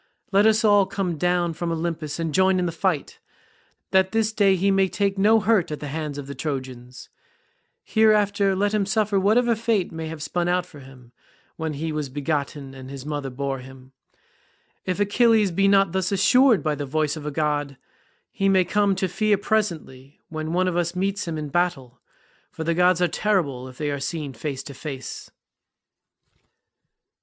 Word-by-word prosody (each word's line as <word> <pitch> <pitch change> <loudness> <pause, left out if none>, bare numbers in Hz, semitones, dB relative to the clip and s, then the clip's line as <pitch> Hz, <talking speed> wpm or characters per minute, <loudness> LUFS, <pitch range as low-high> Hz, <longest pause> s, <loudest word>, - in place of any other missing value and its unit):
Let 200 +2 +5
us 220 0 +3
all 205 -2 +5
come 190 -3 -2
down 175 0 +1
from 170 +1 -3
Olympus 160 -2 -3
and 165 -2 -2
join 190 +2 +3
in 180 - 0
the 170 - -1
fight, 165 -2 -2 0.7
that 190 +1 +3
this 220 -1 +1
day 200 -3 +4
he 195 +2 +1
may 195 0 +3
take 200 +1 -1
no 210 +3 +4
hurt 210 -3 +2
at 150 - -4
the 150 - -6
hands 150 -1 -4
of 145 - -6
the 140 - -7
Trojans. 130 -4 -6 0.8
Hereafter 205 -2 +3
let 205 +2 0
him 205 -2 +1
suffer 205 0 +1
whatever 230 +4 +3
fate 220 -4 0
may 160 -1 -5
have 155 -2 -6
spun 175 +2 -1
out 180 0 +1
for 155 -5 -14
him 130 -3 -15 0.4
when 160 -1 -3
he 160 +3 -3
was 150 -2 -3
begotten 140 -1 -3
and 130 -1 -10
his 135 -1 -8
mother 145 -2 -3
bore 135 +1 -3
him. 130 0 -13 0.9
If 185 +1 -2
Achilles 210 0 +3
be 195 +3 +2
not 195 -2 +4
thus 190 +1 -1
assured 225 - +4
by 155 - 0
the 145 -1 -5
voice 155 +2 0
of 150 -1 -7
a - - -2
god, 145 -2 -1 0.5
he 195 0 0
may 190 -2 +4
come 200 +1 +2
to 190 0 -1
fear 210 +3 +1
presently 170 -11 -3
when 155 0 -4
one 185 +2 +1
of 180 - -1
us 175 0 -1
meets 195 +1 -2
him 165 -1 -3
in 150 -1 -5
battle, 145 -7 -2 0.5
for 160 - -6
the 170 +1 0
gods 180 +1 +3
are - - +4
terrible 160 -9 -1
if 130 -1 -13
they 150 -1 -2
are 140 - -3
seen 145 0 -4
face 140 -2 -5
to 140 - -9
face." 135 -2 -7
170 Hz, 185 wpm, -23 LUFS, 145-195 Hz, 0.9 s, Let